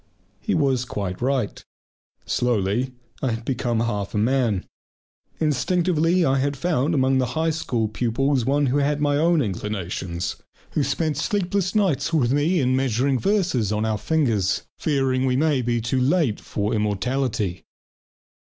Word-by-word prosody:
He 210 Hz, -, -1 dB
was 135 Hz, -5 st, +2 dB
quite 100 Hz, -6 st, -4 dB
right. 130 Hz, -4 st, -1 dB, 0.6 s
Slowly 120 Hz, +1 st, 0 dB, 0.3 s
I 130 Hz, -4 st, 0 dB
had 115 Hz, +1 st, -6 dB
become 120 Hz, -3 st, -1 dB
half 105 Hz, -4 st, -2 dB
a -, -, +1 dB
man. 115 Hz, -3 st, +1 dB, 0.7 s
Instinctively 165 Hz, +3 st, +2 dB
I 135 Hz, -1 st, +2 dB
had 140 Hz, +1 st, -1 dB
found 155 Hz, 0 st, 0 dB
among 130 Hz, -1 st, +3 dB
the 130 Hz, -, +1 dB
High 160 Hz, 0 st, +2 dB
School 120 Hz, -8 st, -1 dB
pupils 125 Hz, +4 st, 0 dB
one 145 Hz, +4 st, +2 dB
who 135 Hz, +2 st, +1 dB
had 145 Hz, +1 st, +1 dB
my 145 Hz, -1 st, +2 dB
own 165 Hz, 0 st, +3 dB
inclinations, 90 Hz, -4 st, -3 dB, 0.3 s
who -, -, 0 dB
spent 155 Hz, 0 st, -1 dB
sleepless 190 Hz, +2 st, -1 dB
nights 190 Hz, -11 st, +1 dB
with 135 Hz, -7 st, +2 dB
me 160 Hz, +5 st, +2 dB
in 130 Hz, -2 st, +2 dB
measuring 130 Hz, +1 st, +1 dB
verses 180 Hz, -, +1 dB
on 105 Hz, +1 st, 0 dB
our 110 Hz, -1 st, -1 dB
fingers, 115 Hz, -, +1 dB, 0.2 s
fearing 135 Hz, -3 st, +1 dB
we 125 Hz, 0 st, +1 dB
might 140 Hz, -5 st, +1 dB
be 120 Hz, -1 st, +1 dB
too 120 Hz, +3 st, -1 dB
late 140 Hz, -, +2 dB
for 105 Hz, 0 st, -2 dB
immortality. 105 Hz, -1 st, -1 dB
130 Hz, 150 wpm, -23 LUFS, 115-150 Hz, 0.7 s, among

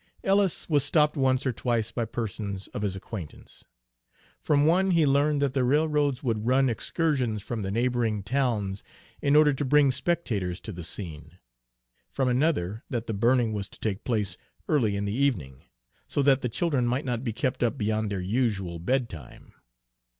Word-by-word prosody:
Ellis 195 Hz, -2 st, +2 dB
was 145 Hz, -4 st, +2 dB
stopped 150 Hz, +1 st, +2 dB
once 130 Hz, -2 st, +1 dB
or 130 Hz, -, +2 dB
twice 115 Hz, -2 st, -1 dB
by 115 Hz, 0 st, -2 dB
persons 105 Hz, -3 st, -4 dB
of -, -, -5 dB
his 100 Hz, -2 st, -1 dB
acquaintance. 95 Hz, -4 st, -9 dB, 0.8 s
From 145 Hz, -1 st, +3 dB
one 185 Hz, +4 st, +3 dB
he 170 Hz, -4 st, +4 dB
learned 145 Hz, +1 st, +2 dB
that 135 Hz, -2 st, 0 dB
the 135 Hz, -2 st, +1 dB
railroads 145 Hz, 0 st, +1 dB
would 115 Hz, -3 st, -1 dB
run 130 Hz, 0 st, +3 dB
excursions 125 Hz, -4 st, -1 dB
from 115 Hz, -2 st, -4 dB
the 95 Hz, -, -3 dB
neighboring 115 Hz, -1 st, 0 dB
towns 110 Hz, -6 st, -1 dB, 0.4 s
in 140 Hz, 0 st, +3 dB
order 150 Hz, -1 st, +6 dB
to 135 Hz, -, -2 dB
bring 140 Hz, 0 st, +4 dB
spectators 120 Hz, -, -1 dB
to 110 Hz, -, -7 dB
the 90 Hz, -3 st, -7 dB
scene; 80 Hz, -2 st, -7 dB, 0.7 s
from 135 Hz, -1 st, -1 dB
another 120 Hz, -, 0 dB
that 120 Hz, -2 st, -2 dB
the 115 Hz, -, -3 dB
burning 115 Hz, +2 st, +2 dB
was 100 Hz, -2 st, -4 dB
to -, -, -16 dB
take 105 Hz, -1 st, -2 dB
place 110 Hz, -5 st, -1 dB, 0.3 s
early 115 Hz, -9 st, +2 dB
in 100 Hz, 0 st, -2 dB
the 100 Hz, -, -2 dB
evening, 110 Hz, -, -1 dB, 0.4 s
so 145 Hz, -, 0 dB
that 135 Hz, -1 st, +4 dB
the 125 Hz, -, -1 dB
children 135 Hz, -1 st, 0 dB
might 125 Hz, +4 st, -1 dB
not 120 Hz, -2 st, -2 dB
be 120 Hz, -, -1 dB
kept 130 Hz, +3 st, -2 dB
up 120 Hz, -3 st, +1 dB
beyond 110 Hz, 0 st, -1 dB
their 95 Hz, -2 st, -2 dB
usual 95 Hz, -4 st, -1 dB
bedtime. 105 Hz, -, -3 dB
120 Hz, 175 wpm, -27 LUFS, 105-140 Hz, 0.8 s, order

